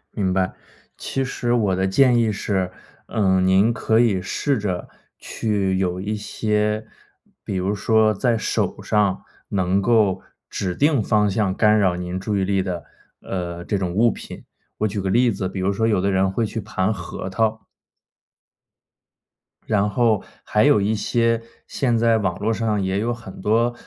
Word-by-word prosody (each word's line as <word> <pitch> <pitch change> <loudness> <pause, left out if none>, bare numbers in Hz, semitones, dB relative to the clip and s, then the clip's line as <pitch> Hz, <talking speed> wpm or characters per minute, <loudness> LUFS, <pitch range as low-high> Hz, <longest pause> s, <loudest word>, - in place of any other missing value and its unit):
明 95 -4 0
白。 95 0 0 0.4
其 135 - -2
实 120 -2 -2
我 105 -6 +2
的 95 +1 0
建 125 +5 +4
议 115 -2 +2
是， 95 -3 -2 0.4
嗯， 95 -3 +2
您 95 +5 +4
可 110 0 +1
以 110 -6 +3
试 135 +8 -1
着 95 -4 -3 0.3
去 100 -4 -1
有 90 -1 -1
一 105 +3 -2
些 105 0 -1 0.6
比 - - -4
如 95 +2 0
说 110 +1 +3
在 115 +2 +1
手 - - -1
上， 100 -3 +1 0.3
能 95 0 +1
够 105 -3 +2 0.3
指 90 -2 -3
定 145 - +2
方 105 0 +2
向 100 -1 0
干 105 +1 +4
扰 95 -3 +2
您 90 +1 -4
注 100 +2 -2
意 95 - +1
力 95 0 +1
的， 90 -3 -4 0.4
呃， 85 -2 -5
这 100 - -1
种 95 -2 -2
物 115 +4 +4
品。 - - -9 0.4
我 110 - +2
举 100 0 -3
个 95 - -2
例 120 +4 +3
子， 95 -2 -3
比 95 - -6
如 95 +2 0
说 110 +3 +1
有 105 -4 +2
的 100 +2 +1
人 95 0 +2
会 115 +4 0
去 110 +1 -4
盘 100 -1 -1
核 90 0 -6
桃。 110 +2 -1 2.0
然 105 -2 +1
后 115 -3 +2 0.2
还 105 - +2
有 145 -6 +5
一 105 +2 +1
些 115 +1 +1 0.3
现 120 -4 0
在 115 0 +3
网 95 -4 -1
络 110 +2 0
上 110 -2 0
也 95 +1 0
有 115 +3 0
很 115 -6 -10
多， 115 +4 +2
105 Hz, 185 characters per minute, -22 LUFS, 95-110 Hz, 2.0 s, 有